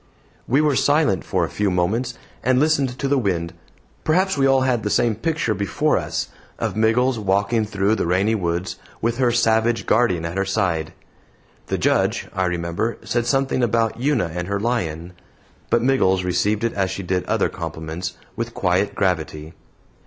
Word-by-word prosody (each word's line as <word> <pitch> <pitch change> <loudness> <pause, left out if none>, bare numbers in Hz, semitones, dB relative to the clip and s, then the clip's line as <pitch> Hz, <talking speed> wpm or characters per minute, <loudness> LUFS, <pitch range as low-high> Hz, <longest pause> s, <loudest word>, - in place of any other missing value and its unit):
We 135 +5 +3
were 150 -2 +2
silent 145 - +2
for 90 -2 0
a - - -7
few 105 -1 0
moments, 110 +8 0 0.3
and 130 0 +2
listened 140 -4 +1
to 140 - -2
the 140 0 +2
wind. 85 -7 -1 0.5
Perhaps 185 +5 +2
we 135 -1 +3
all 135 -1 +4
had 130 -3 +1
the 105 - -2
same 120 +1 +2
picture 155 -3 -1
before 100 -2 0
us - - -2 0.3
of - - -2
Miggles 115 +3 +2
walking 100 +3 +1
through 100 0 0
the 110 - 0
rainy 95 +5 +2
woods, 90 -3 -2 0.2
with 115 +2 -1
her 125 -2 +3
savage 115 0 +2
guardian 90 -8 +2
at 85 +3 -4
her - - +2
side. 90 -6 -1 0.7
The - - -1
Judge, - - +1
I 95 0 0
remember, 90 +5 -2
said 120 -1 -1
something 135 0 +1
about 115 -1 +1
Una 130 - +1
and 90 0 -4
her 100 0 -1
lion; 90 -7 -2 0.6
but 120 -1 +2
Miggles 95 -8 +2
received 105 +4 0
it 115 - 0
as 95 -1 0
she 100 - -5
did 90 0 -1
other - - +1
compliments, 85 +3 -6 0.2
with 115 0 -4
quiet 95 +2 +1
gravity. 80 -4 -1
110 Hz, 175 wpm, -22 LUFS, 90-120 Hz, 0.7 s, all